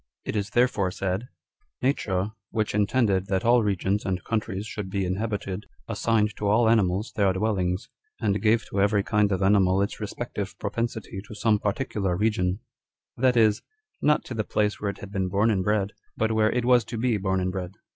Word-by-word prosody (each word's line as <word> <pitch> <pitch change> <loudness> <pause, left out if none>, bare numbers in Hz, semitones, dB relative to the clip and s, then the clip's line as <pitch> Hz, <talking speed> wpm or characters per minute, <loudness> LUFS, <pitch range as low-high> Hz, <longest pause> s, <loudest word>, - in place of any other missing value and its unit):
It - - -3
is 100 -1 -1
therefore 105 -4 +2
said 95 +1 -2
â€" - - -11 0.3
" - - -46
Nature, 100 -7 0 0.2
which 110 -2 -1
intended 100 -2 +2
that 95 0 0
all 120 +1 +5
regions 100 0 0
and 90 -2 -2
countries 105 -3 -2
should 105 -3 -5
be 100 0 -1
inhabited, 100 +1 -3 0.2
assigned 110 -1 +1
to 105 - -2
all 110 +3 +4
animals 105 -2 +2
their 100 -3 +3
dwell 105 +1 0
ings, 90 +4 -1 0.3
and 100 0 0
gave 110 +1 +3
to 100 - 0
every 100 0 +3
kind 105 -1 +2
of 95 0 0
animal 95 -1 +4
its 100 - -1
respective - - -5
propensity 115 -4 -3
to 105 - -9
some 105 0 +2
particular 100 -4 -1
region 100 -2 0 0.3
;" - - -62
that 130 -2 +4
is, 110 -2 +4 0.4
not 150 0 +3
to - - -6
the 110 -2 -1
place 105 0 0
where 105 - 0
it 100 - -5
had 100 - -8
been 95 -2 -1
born 100 +4 +2
and 95 -3 +1
bred, 105 0 +1 0.3
but 110 0 +1
where 110 -1 +3
it 125 0 0
was 125 -1 +5
to 115 - -5
be 115 -1 +1
born 95 -1 0
and 90 0 -1
bred. 90 -1 -5
105 Hz, 205 wpm, -26 LUFS, 95-110 Hz, 0.4 s, all